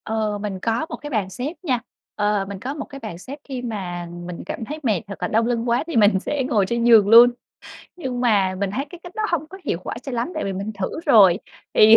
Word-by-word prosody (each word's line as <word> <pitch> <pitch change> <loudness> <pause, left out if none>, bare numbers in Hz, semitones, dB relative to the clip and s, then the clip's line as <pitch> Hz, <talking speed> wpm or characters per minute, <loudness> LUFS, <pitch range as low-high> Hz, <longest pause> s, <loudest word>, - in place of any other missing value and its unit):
Ờ, 215 -1 -1
mình 200 -3 -4
có 225 +10 0
một - - -4
cái 295 - -8
bàn 215 -8 -1
xếp 255 - -4
nha, 260 -8 +1 0.4
ờ, 205 -1 +1
mình 200 -1 -6
có 260 +7 -4
một 290 -1 -5
cái 275 - -10
bàn 215 -9 -7
xếp, 265 +11 -8
khi 260 -3 -5
mà 185 -7 -4 0.2
mình 175 -1 -6
cảm 225 - -5
thấy 300 +6 -6
mệt 215 -7 +1
hoặc 200 - -6
là - - 0
đau 225 +2 +2
lưng 235 0 0
quá 235 +1 +2
thì 335 - -4
mình 205 -3 +5
sẽ 280 +7 -2
ngồi 205 -6 +2
trên 235 +4 -1
giường 225 -4 +6
luôn. 235 +2 +10 0.7
Nhưng 260 -8 -4
mà 200 -6 +3
mình 200 0 -1
thấy 260 +8 -2
cái 350 - -11
cách 355 - -11
đó 435 - -2
hông 320 -3 0
có 385 - -10
hiệu - - -1
quả - - -4
cho 270 - -6
lắm, 240 +3 -1
tại - - -2
vì 195 - -2
mình 200 +3 -4
thử 195 +9 -4
rồi, 200 - +7 0.4
thì 220 +1 +9
225 Hz, 260 wpm, -22 LUFS, 200-260 Hz, 0.7 s, luôn